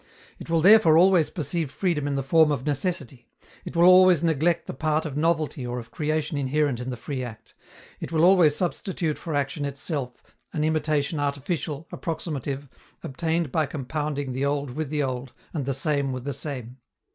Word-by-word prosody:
It - - -10
will 165 -1 +2
therefore 190 -4 +7
always 180 -2 +5
perceive 160 -1 -3
freedom 150 -2 -1
in 140 - -1
the 135 - -1
form 155 +2 +4
of 140 -2 -2
necessity; 145 -4 -3 0.4
it - - -7
will 170 - +4
always 185 -2 +7
neglect 165 +1 +1
the - - -6
part 155 +3 0
of 145 -3 -5
novelty 155 -3 0
or 120 0 -4
of 115 -1 -8
creation 155 +1 -1
inherent 140 -1 0
in 125 +1 -5
the 125 - -4
free 130 +2 -4
act; 115 -3 -10 0.5
it - - -6
will 160 -1 +2
always 175 -5 +5
substitute 175 -2 -2
for 160 -4 -4
action 145 +1 -1
itself 140 -2 -5 0.2
an 150 - -1
imitation 155 -1 0
artificial, 145 +2 -3
approximative, 145 -4 -4 0.4
obtained 165 +1 -1
by 155 0 +1
compounding 145 0 -3
the 130 +2 -2
old 140 -1 -1
with 155 +2 -4
the 150 -1 0
old 130 -1 -4 0.2
and 140 -5 -3
the - - +1
same 140 -1 0
with 130 -1 -5
the 140 +1 -3
same. 130 -3 -6
150 Hz, 180 wpm, -25 LUFS, 135-160 Hz, 0.5 s, therefore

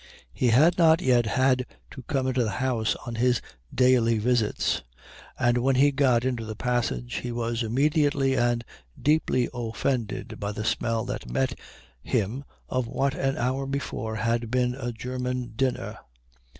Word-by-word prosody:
He 125 - +1
had 155 +10 +5
not 165 -1 +6
yet 125 -9 +3
had 130 +1 +2 0.2
to 130 - -9
come 130 +1 -1
into 130 -1 +1
the 110 - -1
house 120 -4 0
on 120 - -5
his 120 0 +2 0.3
daily 125 -3 +3
visits, 115 -1 +1 0.6
and 120 0 +2
when 130 +2 +2
he 140 +3 +5
got 130 -4 +2
into 125 -3 -1
the 110 0 -6
passage 110 - -1
he 120 - -4
was 115 0 -2
immediately 140 +3 +2
and 120 -1 +1 0.3
deeply 145 -4 +2
offended 120 0 -3
by 100 0 -3
the 105 +1 -4
smell 115 0 0
that - - -5
met 65 +2 0 0.5
him 125 - -1 0.2
of 130 -2 -1
what 135 +3 0
an 135 0 -1
hour 130 +3 -1
before 135 -5 -3
had 115 +1 -1
been 125 0 +1
a 125 -2 -4
German 125 0 -4
dinner. 130 +1 -2
125 Hz, 155 wpm, -26 LUFS, 115-130 Hz, 0.6 s, not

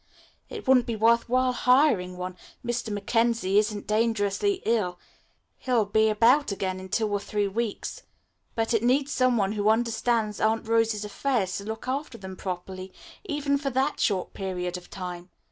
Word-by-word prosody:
It 435 - -8
wouldn't 255 -2 +5
be 230 - -1
worth 230 +2 +3
while 255 +1 +3
hiring 250 -9 +3
one. 180 0 -5 0.3
Mr. 240 -1 -2
Mackenzie 210 -1 +1
isn't 210 -1 -2
dangerously 225 - 0
ill. 205 -6 +1 0.6
He'll 245 -4 +1
be 220 +2 +3
about 235 +6 +4
again 190 -1 -2
in 190 0 -9
two 220 +3 +1
or 205 -1 -1
three 205 0 -1
weeks. 215 +1 -3 0.5
But 225 0 0
it 225 - +3
needs 270 +4 +2
some 255 -3 +2
one 195 -2 +1
who 210 0 +1
understands 225 -1 +1
Aunt 220 +1 +1
Rose's 225 -2 +1
affairs 210 -3 -1
to 200 - -9
look 220 +2 -6
after 265 -1 -3
them 190 -3 -8
properly, 185 0 -6 0.3
even 290 -5 0
for 275 -1 -2
that 265 +1 0
short 190 -4 0
period 180 -2 -3
of 180 -1 -9
time. 180 -1 -7
220 Hz, 165 wpm, -26 LUFS, 195-245 Hz, 0.6 s, wouldn't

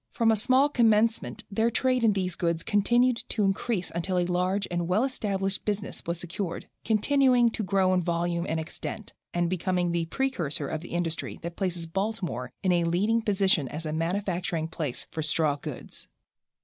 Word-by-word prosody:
From 230 -2 +2
a - - +4
small 255 +6 +4
commencement 225 -4 +2
their 225 +3 +2
trade 255 +1 +1
in 220 -2 +5
these 185 -2 -1
goods 170 -1 -1
continued 240 +4 +3
to 215 - 0
increase 195 0 0
until 175 +2 -1
a 175 - +2
large 180 +3 0
and 175 -1 -1
well 190 +6 +2
established 195 -7 -2
business 205 -1 -3
was 170 0 -2
secured, 175 0 -4 0.2
continuing 245 +2 +3
to 225 - -3
grow 190 -2 +2
in 180 - +3
volume 170 0 -1
and 160 +1 0
extent, 175 +6 -6 0.2
and 175 0 +1
becoming 180 0 0
the 170 -1 -1
precursor 170 - -1
of 155 +3 -4
an - - -9
industry 170 -1 -2
that 170 0 -5
places 180 -3 -2
Baltimore 185 - -3
in 185 - +3
a 175 -1 +3
leading 200 +7 +2
position 195 -8 +2
as 155 +5 -6
a 155 - -2
manufacturing 175 0 -1
place 160 -5 -4
for 160 - -3
straw 155 -1 +2
goods. 145 - -8
185 Hz, 175 wpm, -27 LUFS, 170-215 Hz, 0.2 s, in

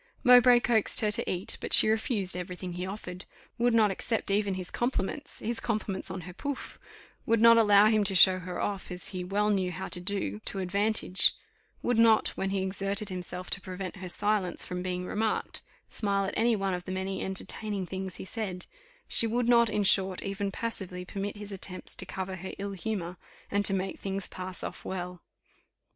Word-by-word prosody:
Mowbray 245 0 +7
coaxed 225 -4 +2
her 210 -1 +1
to 230 +3 -1
eat, 180 +1 -3
but - - -2
she - - +10
refused 215 -4 0
every 180 0 -5
thing 180 -1 -7
he 180 +1 -4
offered 185 -2 -7 0.3
would 240 0 +3
not 215 -3 +4
accept 220 +2 -1
even 200 -1 +1
his 185 -1 -4
compliments 245 +3 -3
his 230 +1 -2
compliments 210 -5 -3
on 190 0 -5
her 180 +1 -10
pouf 285 +9 -6 0.5
would 230 0 +3
not 230 +1 +8
allow 205 -2 +6
him 215 -1 +3
to 195 - +3
show 185 0 +7
her 180 -1 -6
off, 200 -2 -3
as 180 -1 -4
he 185 -2 -5
well 205 +3 0
knew 190 -3 0
how 190 +2 -5
to 180 - -2
do, 180 - -2
to - - -2
advantage; 200 +1 +3 0.5
would 245 -2 +1
not, 225 -1 +5
when 195 - -3
he 195 -1 -1
exerted 195 +2 0
himself 180 0 -6
to 200 - -2
prevent 185 0 -6
her 185 -1 -7
silence 205 -1 0
from 180 0 -5
being 180 0 -3
remarked, 215 +3 -2 0.3
smile 200 -2 -1
at 195 - -4
any 230 +1 +3
one 195 -2 -1
of 180 0 -5
the 185 - -5
many 190 0 -3
entertaining 195 +1 -2
things 190 0 -5
he - - -8
said; 190 -3 -5 0.4
she 230 - +5
would 235 +1 0
not, 235 -1 +5
in 210 -1 0
short, 190 -1 +4
even 195 0 -3
passively 185 -4 -4
permit 200 +2 -5
his 205 0 -8
attempts 190 -1 -6
to - - -4
cover 190 0 -5
her 190 +1 -7
ill 200 0 -4
humour, 185 -3 -4 0.3
and 205 0 +1
to 195 - +6
make 190 0 -3
things 195 0 -2
pass 185 0 -6
off - - -6
well. 180 -1 -6
195 Hz, 200 wpm, -28 LUFS, 185-215 Hz, 0.5 s, she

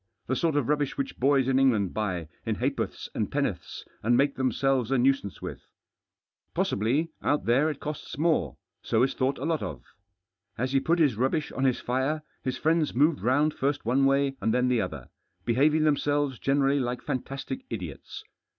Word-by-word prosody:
The 130 - -1
sort 160 +3 +1
of 145 -5 +1
rubbish 145 -1 0
which 140 -1 -4
boys 135 0 +3
in 135 0 +3
England 110 -8 +2
buy 95 -7 -2 0.2
in - - -1
ha'porths - - -2
and - - -2
penn'orths, - - -3 0.2
and 120 +2 +3
make 140 +1 +3
themselves 130 -2 +1
a 135 - +2
nuisance 125 -5 +1
with. - - -7 0.9
Possibly, 135 +11 0
out 145 - 0
there 135 +7 +3
it 150 - -5
costs 150 -2 -6
more, 155 - +1 0.2
so 115 - +2
is 135 - +1
thought 130 +2 0
a 135 - -4
lot 160 -1 0
of. 65 -5 -5 0.7
As 130 +3 -1
he 135 - +3
put 165 +5 +1
his 145 -10 +3
rubbish 135 +5 0
on 135 - -1
his 130 -2 +2
fire, 135 +5 -1 0.2
his 130 -1 -2
friends 160 -2 +1
moved 150 +4 +3
round 145 +6 +2
first 140 -1 -1
one 130 +4 +3
way 135 0 +2
and 110 - +1
then 125 +1 +2
the 120 -3 +2
other, 80 - -5 0.4
behaving 150 +6 +3
themselves 145 -3 +1
generally 140 0 +2
like 125 -1 -2
fantastic 135 -1 -4
idiots. 90 - -7
135 Hz, 180 wpm, -27 LUFS, 120-145 Hz, 0.9 s, boys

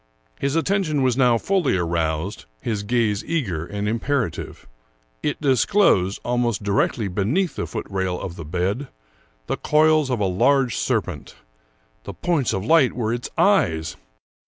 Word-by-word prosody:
His 140 +2 -1
attention 165 -4 +1
was 130 -2 +2
now 125 -3 +4
fully 175 - +1
aroused, 85 +2 -2
his 105 - -2
gaze 105 -2 0
eager 95 - -2
and 105 0 -3
im 115 +2 0
perative. 125 - -3 0.6
It 150 - -2
disclosed, 130 - +3
almost 120 -3 0
directly 100 +2 0
beneath 125 - 0
the - - -3
foot 110 - -5
rail 95 -2 -2
of 85 - -6
the 85 - -7
bed, 95 - -2 0.6
the - - -2
coils 155 -1 +3
of 125 -3 0
a 100 - +1
large 120 +6 +2
serpent - - -2 0.3
— - - -40
the - - -6
points 160 -8 0
of 95 +1 -2
light 155 -3 +4
were 115 -2 -1
its 120 0 -4
eyes 85 - +2
115 Hz, 155 wpm, -22 LUFS, 95-140 Hz, 0.6 s, now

